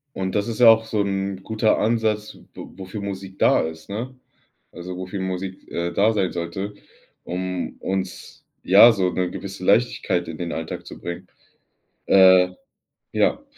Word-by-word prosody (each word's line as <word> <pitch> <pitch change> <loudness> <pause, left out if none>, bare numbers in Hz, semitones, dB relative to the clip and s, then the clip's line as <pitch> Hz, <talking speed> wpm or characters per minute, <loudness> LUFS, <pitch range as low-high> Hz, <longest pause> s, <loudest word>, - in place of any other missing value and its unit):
Und, 95 -1 -3
das 105 +2 0
ist 115 +1 -4
ja 120 - +8
auch 115 0 +6
so 110 -1 -2
‘n 95 -1 -3
guter 110 +1 +1
Ansatz 110 -1 0
w - - -17
wo - - -9
wofür 95 +3 -6
Musik 95 -1 -7
da - - +4
ist, 80 0 -7
ne? 115 +6 -5 0.6
Also, 90 +1 -7
wofür 95 +2 -5
Musik, 95 0 -5
äh, 85 0 -2
da 110 +3 +3
sein 95 -4 0
sollte, 90 +4 -4 0.5
um 90 0 -4
uns, 95 -2 -5 0.2
ja, 100 +6 +8
so 95 -4 0
‘ne 90 -1 -1
gewisse 95 -1 -7
Leichtigkeit 100 -4 +1
in 80 - -7
den 85 -1 -4
Alltag 80 0 -5
zu - - -10
bringen. 85 0 -6 0.8
Äh, 95 -1 +6 0.6
ja. - - +1
95 Hz, 165 wpm, -22 LUFS, 90-105 Hz, 0.8 s, ja